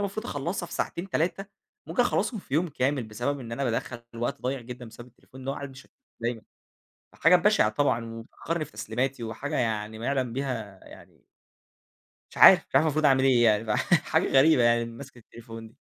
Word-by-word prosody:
المفروض 215 +4 -6
أخلصها 170 - -3
في - - -13
ساعتين 175 +3 -3
3 185 +4 -1 0.4
ممكن 245 - +1
أخلصهم 245 -2 -1
في 140 - -7
يوم 170 +4 +1
كامل 135 -1 -1
بسبب 120 +6 -3
إن 115 -2 -8
أنا 135 +4 -2
بادخل 120 0 -3
وقت 120 +1 -3
ضايع 130 +1 -2
جدًا 125 +1 -9
بسبب 120 +2 -12
التليفون 130 +2 -15
ده، 135 - -2
وقاعد 140 0 -6
مش 130 0 -13
شغال - - -27 0.3
دايمًا. 115 -1 -2 0.7
فحاجة 180 +2 +5
بشعة 205 - +3
طبعًا 115 0 0
وبتأخرني 155 +8 -5
في - - -17
تسليماتي 115 +5 -3
وحاجة 145 +7 -4
يعني 110 -2 -2
ما 115 - -5
يعلم 130 -4 -1
بيها 115 -7 -4
يعني - - -16 1.1
مش - - -12
عارف، - - +9
مش - - -11
عارف - - +5
المفروض 155 0 +1
أعمل 135 -2 +4
إيه، 120 -5 +4
فيعني 110 -2 -1 0.3
حاجة - - +1
غريبة 135 -1 +5
يعني 120 0 +3
مسكة 125 +3 -11
التليفون 115 0 -11
دي. 110 - -22
130 Hz, 190 wpm, -26 LUFS, 115-145 Hz, 1.1 s, عارف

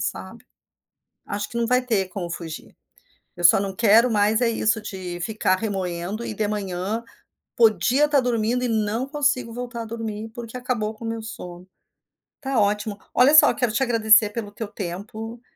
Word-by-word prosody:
sabe. - - -5 0.8
Acho 205 0 -4
que 235 - -6
não 230 -1 0
vai 250 +1 +3
ter 210 -7 0
como 180 -2 -5
fugir. 165 -3 -8 0.6
Eu 175 - -7
só 170 - +8
não 195 -1 -3
quero 230 +2 +5
mais 215 +2 +2
é 240 - +3
isso, 220 -1 +1
de 185 -4 -6
ficar 185 0 0
remoendo 190 +1 -3
e - - -4
de 210 0 -1
manhã, 200 +1 -3 0.6
podia 235 +6 +4
tá 290 - +4
dormindo 245 -1 0
e 250 - +1
não 220 +2 0
consigo 280 -5 0
voltar 240 -1 -5
a - - -8
dormir, 220 -1 -5
porque 240 0 -7
acabou 240 -4 -2
com 230 - -9
o - - -3
meu 225 0 -3
sono. 180 -4 -9 0.7
Ttá 270 -4 0
ótimo. 210 0 0 0.2
Olha 255 +4 +6
só, 310 - +8
quero 245 -5 0
te 225 - -1
agradecer 220 -3 +5
pelo 210 -2 -5
teu 215 +1 -6
tempo, 215 +4 -7
220 Hz, 175 wpm, -23 LUFS, 200-235 Hz, 0.8 s, só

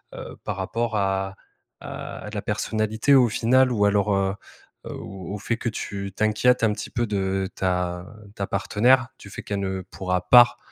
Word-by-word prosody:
heu, - - -8
par - - -4
rapport 115 -1 -2
à 95 -1 -1 0.5
à - - -7
la - - -3
personnalité, 110 +5 0
au 125 -3 +5
final? 125 +3 +3
Ou 105 -4 +2
alors, 100 0 +2
heu 95 0 +1 0.5
heu, - - -6
au 95 -1 -7
au - - -4
fait 115 +3 -2
que 120 - -2
tu 100 -2 -5
t'inquiètes 110 +3 +2
un 110 -2 +3
petit - - -6
peu 120 0 -1
de 95 -2 -1
ta 90 -1 -1 0.3
ta 100 - -3
partenaire? 125 +4 +2
Du 100 - -12
fait 100 - -8
qu'elle 95 -2 -3
pourra 90 -1 -2
pas, 120 -1 +8
105 Hz, 175 wpm, -24 LUFS, 95-115 Hz, 0.5 s, pas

